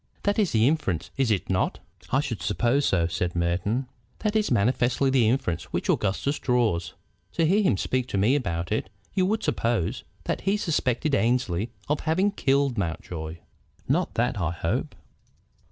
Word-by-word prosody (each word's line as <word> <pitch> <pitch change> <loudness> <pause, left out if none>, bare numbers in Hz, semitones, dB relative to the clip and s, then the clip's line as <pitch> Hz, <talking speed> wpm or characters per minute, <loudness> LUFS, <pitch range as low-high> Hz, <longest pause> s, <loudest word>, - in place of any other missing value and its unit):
That 205 +1 +1
is 200 -5 +2
the 110 +1 +4
inference, 135 - 0
is 135 -3 +1
it 105 -4 0
not?" 95 -1 0 0.3
"I 135 - +3
should 130 -7 -4
suppose 120 +9 +1
so," 85 -3 +2
said 85 +1 -2
Merton. 90 +9 0 0.3
"That 215 -1 -1
is 215 -1 +2
manifestly 125 +4 +2
the 120 -5 +4
inference 120 - 0
which - - -1
Augustus 105 +9 0
draws. 110 - +1 0.4
To 165 - +2
hear 195 +7 +4
him 185 - +2
speak 130 +5 -1
to 100 - -2
me 105 +7 +4
about 85 -9 -2
it 110 - -1 0.2
you 185 -2 +2
would 220 +2 0
suppose 115 -7 0 0.2
that - - -2
he 200 +2 +1
suspected 150 - 0
Annesley 115 -5 +1 0.2
of 150 +1 +1
having 185 +6 +1
killed 140 - +1
Mountjoy." 80 -2 -4 0.5
"Not - - +1
that, 120 -2 0
I 85 - +1
hope." 85 - -2
120 Hz, 170 wpm, -26 LUFS, 95-145 Hz, 0.5 s, the